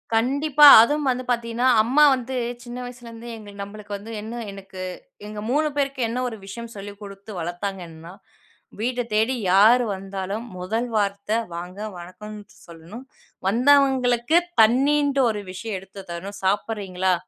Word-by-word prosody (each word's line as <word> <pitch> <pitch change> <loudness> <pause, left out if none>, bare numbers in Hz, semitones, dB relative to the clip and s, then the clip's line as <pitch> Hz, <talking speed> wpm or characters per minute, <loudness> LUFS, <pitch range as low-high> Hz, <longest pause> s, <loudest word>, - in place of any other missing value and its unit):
கண்டிப்பா. 285 +5 +5
அதுவும் 290 +4 +1
வந்து 255 0 -1
பாத்தீங்கணா, 235 +1 -1 0.2
அம்மா 275 +6 +4
வந்து 255 +1 -6 0.3
சின்ன 240 0 -8
வயசுலேருந்தே 235 -1 -10
எங்களுக்கு 205 -2 -9
நம்பளுக்கு 205 0 -8
வந்து 220 +3 -10
என்ன 230 +3 -6
எனக்கு, 195 -1 -10 0.5
எங்க 210 0 -7
3 305 +2 +2
பேருக்கு 275 -2 -1
என்ன 245 +2 -3
ஒரு 225 -2 -6
விஷயம் 230 +3 -8
சொல்லி 200 0 -8
குடுத்து 200 +1 -10
வளத்தாங்கன்னா, 175 -1 -6 0.7
வீடு 245 +2 -1
தேடி 225 +5 +2 0.2
யாரு 225 +5 +6
வந்தாலும் 195 +3 -5
முதல் 220 +7 -2
வார்த்தை, 200 +1 0 0.2
"வாங்க. 180 +3 -7 0.2
வணக்கம்." 210 +5 -10 0.3
சொல்லணும். 170 +10 -11 0.4
வந்தவங்களுக்கு 260 - +3 0.2
தண்ணீன்ட்டு 275 +4 +3
ஒரு 210 -1 -3
விஷயம் 200 +2 -5
எடுத்து 195 +1 -12
தரணும். 195 +4 -7
சாப்பிடுறீங்களா? 190 -2 0
220 Hz, 130 wpm, -23 LUFS, 195-250 Hz, 0.7 s, யாரு